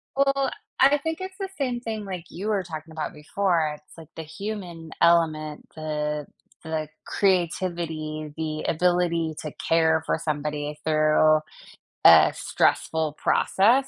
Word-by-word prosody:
Well, 275 Hz, -1 st, +2 dB, 0.3 s
I 280 Hz, +2 st, +6 dB
think 320 Hz, +4 st, -3 dB
it's 375 Hz, +1 st, -6 dB
the 385 Hz, -1 st, -3 dB
same 250 Hz, -4 st, -1 dB
thing 220 Hz, -3 st, -4 dB
like 180 Hz, -3 st, -6 dB
you 200 Hz, +5 st, -6 dB
were 200 Hz, -3 st, +1 dB
talking 160 Hz, -2 st, -8 dB
about 155 Hz, -1 st, -4 dB
before. 155 Hz, 0 st, 0 dB
It's, 150 Hz, +2 st, -19 dB
like, 160 Hz, -2 st, -11 dB
the 160 Hz, -, -6 dB
human 175 Hz, -1 st, -7 dB
element, 155 Hz, -3 st, +2 dB
the 150 Hz, -1 st, -3 dB, 0.4 s
the 155 Hz, -1 st, -3 dB, 0.2 s
creativity, 170 Hz, -5 st, -1 dB
the 155 Hz, -1 st, -3 dB
ability 170 Hz, -2 st, +1 dB
to 155 Hz, -, -5 dB
care 160 Hz, -1 st, +2 dB
for -, -, 0 dB
somebody 150 Hz, -1 st, -3 dB
through 155 Hz, 0 st, +4 dB, 0.7 s
a -, -, +9 dB
stressful 160 Hz, -2 st, 0 dB
process. 240 Hz, -, +3 dB
165 Hz, 135 wpm, -25 LUFS, 155-195 Hz, 0.7 s, a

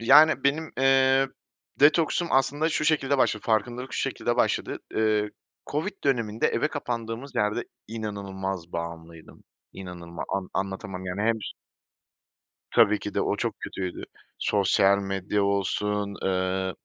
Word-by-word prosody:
Yani, 145 Hz, +4 st, +6 dB
benim, 150 Hz, +3 st, +1 dB
eee, 135 Hz, 0 st, +4 dB, 0.5 s
detoksum 160 Hz, +3 st, +4 dB
aslında 135 Hz, +4 st, +2 dB
şu 155 Hz, -, 0 dB
şekilde 145 Hz, -3 st, +2 dB
başladı, 110 Hz, -4 st, +2 dB
farkındalık 120 Hz, +4 st, 0 dB
şu -, -, -1 dB
şekilde -, -, -1 dB
başladı. -, -, +1 dB, 0.2 s
Eee, 110 Hz, -1 st, +2 dB, 0.4 s
COVID 185 Hz, +7 st, -3 dB
döneminde, 115 Hz, -5 st, +1 dB
eve 150 Hz, -, +1 dB
kapandığımız 120 Hz, -2 st, -4 dB
yerde 105 Hz, +3 st, 0 dB, 0.2 s
inanılmaz 95 Hz, -5 st, -5 dB
bağımlıydım, 85 Hz, -1 st, -7 dB, 0.3 s
inanılma 85 Hz, -3 st, -7 dB
an 95 Hz, -1 st, -4 dB
anlatamam, 95 Hz, 0 st, -3 dB
yani, 90 Hz, +2 st, -3 dB
hem 115 Hz, +1 st, +3 dB
ş -, -, -5 dB, 1.2 s
Tabii 105 Hz, +1 st, +5 dB
ki 105 Hz, -, -6 dB
de, -, -, +1 dB
o -, -, 0 dB
çok -, -, -3 dB
kötüydü. 90 Hz, -2 st, -5 dB, 0.3 s
Sosyal 100 Hz, 0 st, +3 dB
medya 95 Hz, +1 st, -1 dB
olsun, 100 Hz, +1 st, 0 dB
eee, 95 Hz, 0 st, 0 dB
105 Hz, 130 wpm, -26 LUFS, 95-135 Hz, 1.2 s, Yani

